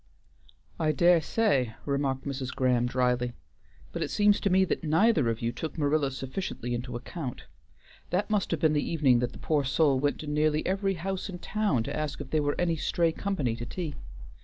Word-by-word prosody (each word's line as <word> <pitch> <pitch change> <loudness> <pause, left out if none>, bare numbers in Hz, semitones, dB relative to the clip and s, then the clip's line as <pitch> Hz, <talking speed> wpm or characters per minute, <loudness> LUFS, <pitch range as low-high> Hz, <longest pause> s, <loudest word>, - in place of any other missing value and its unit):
"I 155 -1 +2
dare 170 +2 +5
say," 140 - +1
remarked 140 -2 -1
Mrs. 135 -2 -3
Graham 125 -2 +2
drily, 125 -1 0 0.6
"but 170 - -5
it 155 - -1
seems 205 -1 +3
to 200 - 0
me 190 +1 +4
that - - -2
neither 160 - +3
of 115 0 -3
you 115 - +1
took 160 +6 -6
Marilla 145 -1 +2
sufficiently 135 -2 -4
into 120 +1 -4
account. 125 +2 -6 0.7
That 185 +4 0
must 205 -3 +1
have 165 - -1
been 155 -1 +4
the 145 - +2
evening 140 -7 +3
that 125 0 -1
the - - -11
poor 150 -3 0
soul 135 0 +2
went 145 +1 0
to - - -7
nearly 150 +1 +1
every 195 0 0
house 190 +3 -4
in 180 - -5
town 195 - 0
to - - -4
ask 155 -1 -3
if 145 -2 -7
there 155 - +2
were 145 0 -1
any 170 -2 +1
stray 165 +2 +1
company 160 - -1
to 120 - -5
tea. 170 -5 -4
150 Hz, 200 wpm, -28 LUFS, 130-175 Hz, 0.7 s, dare